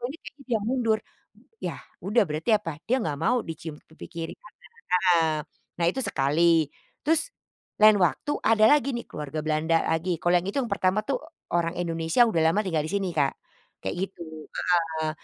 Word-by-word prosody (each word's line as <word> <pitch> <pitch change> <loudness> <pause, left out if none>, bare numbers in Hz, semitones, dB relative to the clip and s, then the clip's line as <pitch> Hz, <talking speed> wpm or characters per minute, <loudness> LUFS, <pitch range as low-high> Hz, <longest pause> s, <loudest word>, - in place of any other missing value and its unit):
kok 240 - -2
ini 290 - -7
bikin - - -10
dia 230 - +2
mundur, 230 -3 +1 0.6
ya, - - -3 0.2
udah 220 +4 +3
berarti 155 +9 -2
apa, 165 -8 0
dia 255 +3 +1
enggak 155 - -2
mau 165 - +1
dicium 160 -1 -7
pipi 160 - -11
kiri-kanan 170 +5 -8 0.4
heeh. 170 -3 +4 0.5
Nah - - +3
itu 190 - -5
sekali, 155 +2 +3 0.3
terus, 325 +11 +1 0.5
lain 215 0 +9
waktu 180 - +1
ada 215 -1 +5
lagi 280 -2 +2
nih 235 - -4
keluarga 150 +1 -5
Belanda 160 +1 +2
lagi, 165 +2 0
kalau 175 - +2
yang 175 - -2
itu, 205 - -4
yang 240 - -4
pertama 195 +1 +1
tuh, 275 - 0 0.4
orang 170 0 +1
Indonesia 165 +3 0
udah 190 -8 +1
lama 210 - +2
tinggal 165 -5 0
di - - -5
sini 195 -2 0
Kak, 140 -2 +2 0.5
kayak 95 - -3
gitu 190 -1 -4 0.6
heeh. 160 -1 -2
175 Hz, 175 wpm, -26 LUFS, 160-215 Hz, 0.6 s, lain